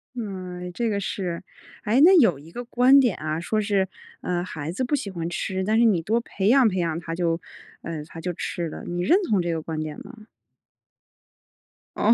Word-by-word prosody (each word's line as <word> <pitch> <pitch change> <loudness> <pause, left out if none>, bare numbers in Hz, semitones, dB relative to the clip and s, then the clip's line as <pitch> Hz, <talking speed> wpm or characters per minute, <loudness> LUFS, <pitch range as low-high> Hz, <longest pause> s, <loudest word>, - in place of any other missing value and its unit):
哎， 185 -5 -6
这 230 +4 -1
个 200 -1 0
是。 185 -3 -3 0.4
诶， 230 +6 +3
那 370 +5 +8
有 180 - +4
一 160 +3 -14
个 245 +7 -6
观 255 +3 +5
点 245 -7 +3
啊， 155 +1 -3
说 215 +5 -1
是， 200 -2 +1 0.3
呃， 175 -1 -1
孩 160 -3 -5
子 225 +8 -2
不 275 +4 +1
喜 205 -8 -4
欢 170 -2 -4
吃， 190 +2 -2
但 215 +3 +2
是 235 - +5
你 200 -7 +3
多 220 +8 +1
培 200 -4 -3
养 255 +1 +6
培 190 -3 0
养 165 -1 -1
他 165 -1 -6
就， 170 -1 0 0.4
呃， 160 -2 -5
他 165 - -10
就 175 +1 -3
吃 170 +1 -3
了， - - -8
你 175 0 -3
认 360 - +5
同 200 -4 +3
这 170 0 -1
个 160 - -2
观 160 0 -5
点 155 -1 -4
吗？ 250 - -12 1.8
哦。 - - +5
185 Hz, 225 characters per minute, -24 LUFS, 170-225 Hz, 1.8 s, 那